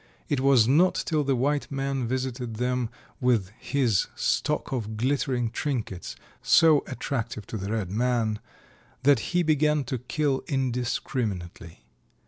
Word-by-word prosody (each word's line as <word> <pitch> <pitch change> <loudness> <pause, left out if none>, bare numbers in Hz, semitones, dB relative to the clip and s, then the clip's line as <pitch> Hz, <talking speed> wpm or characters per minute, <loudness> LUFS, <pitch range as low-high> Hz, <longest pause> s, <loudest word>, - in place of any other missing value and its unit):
It 145 - +1
was 130 -4 +5
not 165 +8 +4
till 155 -3 0
the 135 -1 +1
white 140 +4 0
man 135 -2 -1
visited 125 -2 -3
them 125 0 -1 0.3
with 115 -7 +1
his 125 -9 +1
stock - - 0
of 110 -4 -3
glittering 125 -1 0
trinkets, 120 - -3 0.3
so 160 -3 +5
attractive 115 -6 -4
to 110 - -5
the 100 +1 -4
red 105 -5 -2
man, 115 -1 0 0.6
that 140 -2 +5
he 180 +9 0
began 150 -1 +2
to 130 -1 -3
kill 135 +2 -1
indiscriminately. 120 - -3
125 Hz, 130 wpm, -26 LUFS, 115-140 Hz, 0.6 s, was